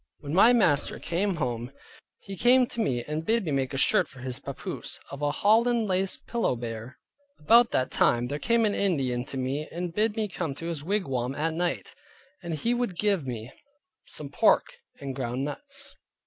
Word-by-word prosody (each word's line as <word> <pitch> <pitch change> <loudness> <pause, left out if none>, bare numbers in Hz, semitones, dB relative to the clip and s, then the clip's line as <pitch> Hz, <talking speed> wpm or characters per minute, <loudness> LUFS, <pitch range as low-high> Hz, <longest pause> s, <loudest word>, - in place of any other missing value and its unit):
When 145 0 -5
my 200 +7 +7
master 180 - +3
came 185 +3 -1
home, 120 -5 -3 0.5
he 195 - -8
came 250 +5 +5
to 235 - -6
me 125 - 0
and 150 +3 -3
bid 225 +3 +1
me 155 - -2
make 135 -2 0
a 135 - -3
shirt - - +3
for - - -16
his 130 0 -3
papoose, 140 -1 -5
of 140 +1 -7
a 145 - +2
holland 225 +7 +3
laced 190 0 -1
pillowbere. 120 - -3 0.4
About 230 +9 +5
that 130 - 0
time 120 0 +3
there 145 +4 -3
came 235 +3 +2
an 205 - +1
Indian 135 -12 0
to 135 - -5
me 135 +4 -2
and 175 0 -4
bid 215 +2 +1
me 220 -1 0
come 170 -7 -4
to 165 - -7
his 155 -4 -4
wigwam 135 -10 -1
at 160 +2 -1
night, 165 - -2 0.5
and 170 -2 -4
he 230 +11 0
would 240 -7 -2
give 195 -7 +1
me 120 0 -5 0.6
some - - -6
pork - - +4 0.3
and 140 -1 -5
ground 125 0 -2
nuts. 275 - -4
160 Hz, 190 wpm, -27 LUFS, 130-210 Hz, 0.6 s, my